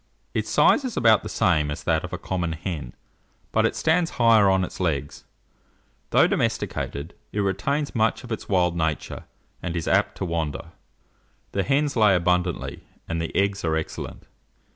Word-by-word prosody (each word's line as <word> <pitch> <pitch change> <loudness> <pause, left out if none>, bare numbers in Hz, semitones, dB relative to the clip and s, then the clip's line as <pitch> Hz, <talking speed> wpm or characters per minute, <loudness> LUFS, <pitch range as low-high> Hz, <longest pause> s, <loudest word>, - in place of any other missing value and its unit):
Its - - -2
size - - +4
is 255 -3 -4
about 115 -2 +5
the - - -7
same 75 -5 +2
as 75 +3 -5
that 80 -2 +1
of 90 - -6
a 90 - -3
common 85 -3 -2
hen, 80 -7 -5 0.6
but - - +3
it - - -4
stands 165 +1 +2
higher 115 -4 +5
on 95 -1 +3
its - - -6
legs. 75 -6 -2 0.8
Though - - +5
domesticated, 70 +4 -2 0.2
it 105 - -3
retains 140 +10 -1
much 110 +1 +1
of 120 - -10
its 110 - -5
wild 90 -3 +2
nature, 80 -2 -2 0.4
and 90 -1 -4
is 85 - -3
apt - - +2
to - - -2
wander. 80 -6 -3 0.8
The 100 - 0
hens 140 +5 +1
lay 105 -4 +5
abundantly, 90 0 0 0.2
and 85 0 -2
the 80 - -3
eggs 100 0 +1
are 80 -1 +1
excellent. 80 -1 -5
90 Hz, 170 wpm, -24 LUFS, 80-110 Hz, 0.8 s, about